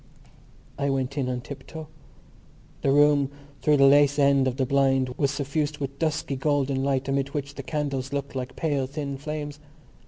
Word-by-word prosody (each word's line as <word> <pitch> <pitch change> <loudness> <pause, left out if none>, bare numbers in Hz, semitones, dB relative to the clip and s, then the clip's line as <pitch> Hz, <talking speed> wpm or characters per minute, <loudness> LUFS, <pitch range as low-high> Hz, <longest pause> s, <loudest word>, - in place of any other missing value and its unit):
I 140 - +1
went 135 0 -1
in 135 -3 -1
on 125 -1 -2
tiptoe. 145 +4 -8 1.0
The - - +1
room 145 -1 +4 0.3
through 150 -1 +4
the 135 - +6
lace 145 +1 +5
end 140 -2 +4
of 130 0 -2
the 135 - +1
blind 135 -1 +2
was 135 +2 0
suffused 145 +2 -2
with 140 -1 -5
dusky 155 -3 -1
golden 135 -1 0
light 135 -1 0
amid 140 +1 -1
which 140 -1 -3
the 140 - -6
candles 140 -2 -3
looked 140 -1 -3
like 130 0 -4
pale 145 -5 0
thin 140 0 -4
flames. 150 0 -5
140 Hz, 175 wpm, -26 LUFS, 135-145 Hz, 1.0 s, the